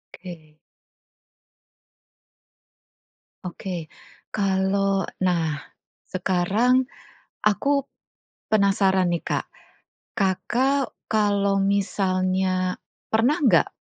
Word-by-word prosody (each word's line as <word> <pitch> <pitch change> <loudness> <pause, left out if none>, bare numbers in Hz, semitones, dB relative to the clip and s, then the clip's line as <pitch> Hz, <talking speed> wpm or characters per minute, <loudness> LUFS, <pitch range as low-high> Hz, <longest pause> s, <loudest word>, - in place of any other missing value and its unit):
Oke. 165 -4 -11 2.9
Oke. 175 -2 -6 0.4
Kalau 195 -1 +1 0.2
nah, 165 -5 0 0.5
sekarang 200 +8 +1 0.6
aku 275 +8 +2 0.7
penasaran 195 -2 +3
nih 170 - -1
Kak, - - -2 0.7
Kakak 250 +8 0 0.2
kalau 200 -2 +2
misalnya 185 -2 0 0.3
pernah 245 +9 +2
enggak, 230 - +4
195 Hz, 60 wpm, -24 LUFS, 185-210 Hz, 2.9 s, enggak